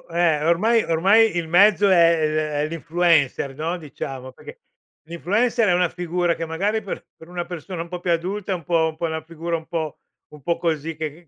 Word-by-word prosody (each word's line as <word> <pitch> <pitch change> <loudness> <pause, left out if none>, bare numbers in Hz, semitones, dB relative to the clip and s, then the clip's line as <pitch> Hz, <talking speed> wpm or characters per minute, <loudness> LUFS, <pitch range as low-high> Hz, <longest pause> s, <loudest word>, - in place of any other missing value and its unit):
eh, 160 -3 +2
ormai 215 +8 +3
ormai 195 +6 +4
il 170 -1 -2
mezzo 200 +4 +5
è 170 -2 +6
è 155 - +2
l 155 - -2 0.3
è - - -1
l'influencer, 160 -4 +1
no, 165 +5 -3
diciamo. 135 -4 -7
Perché - - -13 0.5
l'influencer 210 +8 +1
è - - +4
una 180 -1 +2
figura 175 0 -1
che 165 - -4
magari 200 +7 -1
per 200 - -7
per 160 - -15
una 175 -1 -4
persona 175 0 -6
un 170 - -6
po' 180 0 -5
più 175 0 -1
adulta 185 +4 -2
è - - 0
un 170 - -8
po' 165 0 +2
un 160 - -9
po' 170 - -2
una 160 -1 -3
figura 165 +1 -4
un 160 - -12
po' 160 -3 -4 0.3
un 150 - -14
po' 170 +5 -1
così, 165 -1 -2
che 160 +2 -7
170 Hz, 215 wpm, -22 LUFS, 160-180 Hz, 0.5 s, è